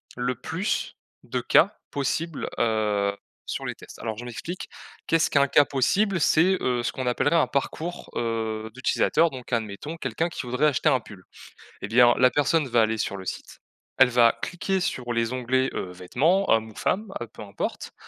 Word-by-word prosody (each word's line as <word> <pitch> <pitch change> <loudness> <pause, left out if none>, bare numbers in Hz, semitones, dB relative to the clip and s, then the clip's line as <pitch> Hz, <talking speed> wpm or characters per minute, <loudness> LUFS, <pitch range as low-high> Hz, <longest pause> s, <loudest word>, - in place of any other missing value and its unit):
le 125 0 -1
plus 180 - -3 0.3
de - - -3
cas - - +4 0.2
possibles, 150 +3 -2
heu, 105 -3 +1 0.3
sur - - -4
les - - -3
tests. - - -13
Alors 110 -1 -4
je 120 - -7
m'explique, 165 +9 -6 0.4
qu'est-ce 165 -1 +3
qu'un 140 -1 +4
cas 145 - +5
possible? 185 - +1
C'est, 175 +5 +4
heu, 120 -1 0
ce - - -1
qu'on 130 -1 -4
appellerait 125 +6 +2
un 160 - +3
parcours, 160 +5 -3
heu, 110 -1 -2
d'utilisateur, 155 +5 +2
donc 130 -1 -9
admettons 115 +7 -3
quelqu'un 165 +1 -1
qui - - -5
voudrait 125 +5 +2
acheter 150 +2 +2
un 130 -3 +3
pull 100 -4 -13 0.6
et - - -4
bien 120 +2 +6
la 125 0 +5
personne 145 +2 +1
va 120 -1 +4
aller 110 0 0
sur 100 - -2
le 95 - -8
site, - - -7 0.4
elle 130 -2 +6
va 120 -1 +4
cliquer 190 +2 -1
sur 125 -7 -2
les 115 +1 0
onglets, 130 +1 0
heu, 90 - -4
vêtements 150 - +1
homme 110 0 +2
ou - - -23
femme, 210 +2 -1
heu, - - -5
peu - - -14
importe. 100 -2 -5
125 Hz, 185 wpm, -25 LUFS, 115-160 Hz, 0.6 s, bien